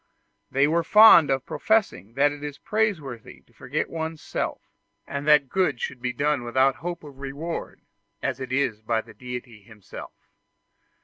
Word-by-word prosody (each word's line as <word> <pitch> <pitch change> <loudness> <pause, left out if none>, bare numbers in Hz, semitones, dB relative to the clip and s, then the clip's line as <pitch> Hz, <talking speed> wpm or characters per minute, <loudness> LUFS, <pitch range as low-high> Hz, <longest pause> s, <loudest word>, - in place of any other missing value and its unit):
They 135 +2 +3
were 165 +2 +1
fond 210 -8 +8
of 135 -1 0
professing 160 - 0
that 145 +1 +3
it 145 0 -9
is 145 -1 -6
praiseworthy 160 - -3
to 120 - -31
forget 135 +6 -3
one's 160 -1 -5
self, - - -4 0.4
and 140 +1 -5
that 150 -2 +5
good 180 -6 0
should 125 0 -5
be 125 0 -1
done 145 0 0
without 130 +3 +2
hope 175 -1 -6
of 140 -3 -12
reward, 140 +5 -6 0.4
as - - -3
it 130 -1 -6
is 130 -5 0
by 110 0 0
the 110 -1 -16
Deity 120 -1 -8
himself. 105 -1 -13
140 Hz, 165 wpm, -25 LUFS, 125-160 Hz, 0.4 s, fond